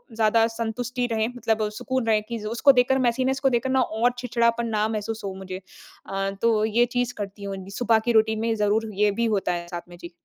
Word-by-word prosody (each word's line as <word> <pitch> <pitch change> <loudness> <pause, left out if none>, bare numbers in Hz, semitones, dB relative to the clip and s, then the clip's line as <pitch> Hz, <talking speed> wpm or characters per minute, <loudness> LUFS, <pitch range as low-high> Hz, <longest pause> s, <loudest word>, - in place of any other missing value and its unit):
ज़्यादा 225 0 +3
सँतुष्टि 240 +2 -3
रहे 220 -1 +1
मतलब 225 -3 -1
सुकून 260 -3 -2
रहे 215 -1 +3
कि 230 +2 -6
ज़ 210 - -8
उसको 235 +5 +5
देखकर 260 0 +3
मेसीनेस 260 +2 0
को 270 - +3
देखकर 255 +1 0
ना 260 0 +3
और 230 +1 +1
चिड़चिड़ापन 235 -1 +1
ना 215 -1 0
महसूस 220 0 -4
हो 195 - -4
मुझे। 190 0 -7 0.5
अ, 195 0 -1
तो 220 -2 +3
ये 230 +2 +3
चीज़ 245 0 -2
करती 200 0 -6
हूँ, 195 -1 -4 0.2
सुबह 230 -2 +3
की 240 - +2
रूटीन 220 -1 +3
में 225 0 0
ज़रूर 215 +1 +1
ये 210 +1 +2
भी 235 +4 -1
होता 195 - 0
है 175 0 -4
साथ 175 0 -7
में। 175 - -12
जी। 170 0 -10
225 Hz, 225 wpm, -24 LUFS, 210-240 Hz, 0.5 s, उसको